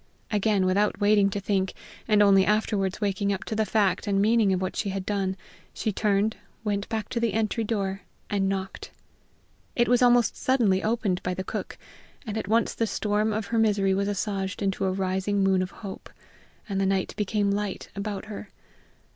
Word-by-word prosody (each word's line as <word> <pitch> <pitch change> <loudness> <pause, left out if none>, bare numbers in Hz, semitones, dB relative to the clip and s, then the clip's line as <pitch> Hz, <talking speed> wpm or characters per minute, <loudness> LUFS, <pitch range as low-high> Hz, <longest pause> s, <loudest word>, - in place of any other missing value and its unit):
Again 205 -2 +2
without 200 +3 +1
waiting 205 -1 +4
to 200 - -3
think, 195 -1 -1 0.3
and 210 -2 +5
only 195 -1 +6
afterwards 210 -1 0
waking 200 0 0
up 195 - -2
to 220 - -4
the 215 -1 +1
fact 200 -2 +1
and 195 -1 +2
meaning 215 0 +4
of 185 - +1
what 185 0 -3
she 205 - -1
had 190 -1 -4
done, 195 -2 -1 0.4
she 215 - -1
turned, 210 +1 +1 0.3
went 205 -2 -2
back 220 -1 -2
to 235 - -2
the 230 -2 0
entry 225 +1 0
door, 200 -3 -2 0.3
and 195 -2 0
knocked. 190 -1 -4 0.9
It 240 - +3
was 245 0 +3
almost 245 -1 +4
suddenly 225 -8 +2
opened 215 -5 0
by 180 0 -2
the 190 - -3
cook, - - -5 0.5
and 215 -2 -4
at 220 - -3
once 225 +2 +2
the 225 - -1
storm 210 +1 0
of 215 0 -2
her 230 - +3
misery 205 -3 +3
was 200 +1 0
assuaged 200 -1 -2
in 195 -1 +1
a 190 -1 +2
rising 190 +1 0
moon 190 -1 +3
of 185 - -2
hope, 195 -1 -9 0.6
and 195 -2 -1
the 195 - +2
night 190 -1 0
became 205 -1 0
light 205 -1 -3
about 200 0 -4
her. 210 -1 -8
200 Hz, 190 wpm, -26 LUFS, 195-215 Hz, 0.9 s, only